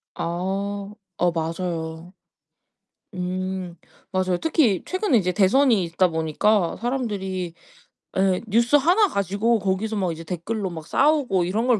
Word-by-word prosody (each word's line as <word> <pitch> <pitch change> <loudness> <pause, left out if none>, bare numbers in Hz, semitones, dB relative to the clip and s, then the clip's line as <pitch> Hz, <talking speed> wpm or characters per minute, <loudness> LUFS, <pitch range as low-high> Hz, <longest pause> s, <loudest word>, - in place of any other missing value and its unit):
아. 195 +4 -3 0.3
어, 175 -1 +4
맞아요. 165 +1 -4 1.0
음. 185 0 -3 0.4
맞아요. 185 -1 +1
특히 270 - +2
최근에 370 - +1
이제 180 -3 0
대선이 215 +4 +4
있다 170 +2 +2
보니까 165 +4 +1
사람들이 200 -8 -3 0.6
예, 190 -1 +2
뉴스 235 +6 +3
하나 355 +9 +4
가지고 205 +2 +1
거기서 200 +3 -1
막 185 -3 0
이제 165 0 -7
댓글로 190 +5 -3
막 160 -2 -8
싸우고 280 - +2
이런 215 +8 -1
걸 240 -4 +4
190 Hz, 265 characters per minute, -23 LUFS, 175-225 Hz, 1.0 s, 어